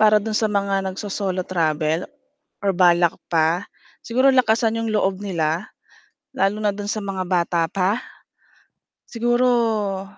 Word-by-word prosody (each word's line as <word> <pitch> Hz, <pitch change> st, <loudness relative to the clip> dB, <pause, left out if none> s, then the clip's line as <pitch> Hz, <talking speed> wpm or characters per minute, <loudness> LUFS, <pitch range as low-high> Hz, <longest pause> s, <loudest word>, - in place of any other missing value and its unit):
para 215 Hz, 0 st, +6 dB
doon 215 Hz, +1 st, -1 dB
sa 215 Hz, 0 st, +1 dB
mga 195 Hz, -1 st, 0 dB
nagso-solo 190 Hz, -1 st, -3 dB
travel, 160 Hz, -1 st, -1 dB, 0.6 s
or 195 Hz, -, +2 dB
balak 175 Hz, -2 st, +4 dB, 0.2 s
pa, 165 Hz, +3 st, +1 dB, 0.3 s
siguro 255 Hz, +4 st, +2 dB
lakasan 230 Hz, -2 st, +2 dB
'yong 225 Hz, -1 st, -2 dB
loob 195 Hz, -2 st, 0 dB
nila 170 Hz, -2 st, -2 dB, 0.7 s
lalo 200 Hz, -2 st, +1 dB
na 205 Hz, -, +2 dB
doon 205 Hz, 0 st, -6 dB
sa 215 Hz, -2 st, -3 dB
mga 195 Hz, -1 st, -3 dB
bata 175 Hz, -1 st, +1 dB
pa. 195 Hz, +6 st, 0 dB, 1.1 s
Siguro, 230 Hz, -5 st, +1 dB
200 Hz, 130 wpm, -22 LUFS, 180-220 Hz, 1.1 s, para